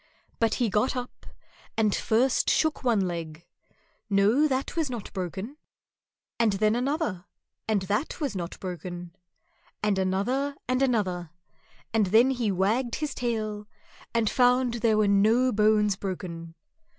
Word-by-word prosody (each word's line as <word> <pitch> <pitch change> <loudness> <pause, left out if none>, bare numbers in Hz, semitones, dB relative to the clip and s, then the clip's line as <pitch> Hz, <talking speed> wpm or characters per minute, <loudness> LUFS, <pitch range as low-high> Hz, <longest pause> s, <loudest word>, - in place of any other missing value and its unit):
But 225 -1 +2
he 245 - +1
got 215 +6 +1
up 250 -1 -7 0.5
and 215 -2 +2
first 235 +3 +2
shook 315 -3 +1
one 235 -5 +3
leg 170 -3 -4 0.6
no, 210 +9 +4
that 265 +2 -2
was 320 -4 0
not 235 -5 -6
broken; 190 - -5 0.8
and 225 -3 +3
then 215 +2 +2
another, 255 - -1 0.4
and 210 -3 +1
that 210 - -2
was 285 -9 -2
not 175 -2 -5
broken; 175 -1 -7 0.7
and 205 -2 +2
another 245 +10 0
and 255 +1 +1
another, 190 -10 0 0.6
and 220 -3 +3
then 230 +7 +5
he 240 -5 0
wagged 220 +6 0
his 300 -2 -3
tail 215 -4 -3 0.4
and 230 -1 +1
found 250 +1 +3
there 225 -2 +2
were 215 -1 +3
no 220 +6 +4
bones 210 -1 +3
broken. 170 -4 -6
215 Hz, 140 wpm, -27 LUFS, 195-250 Hz, 0.8 s, then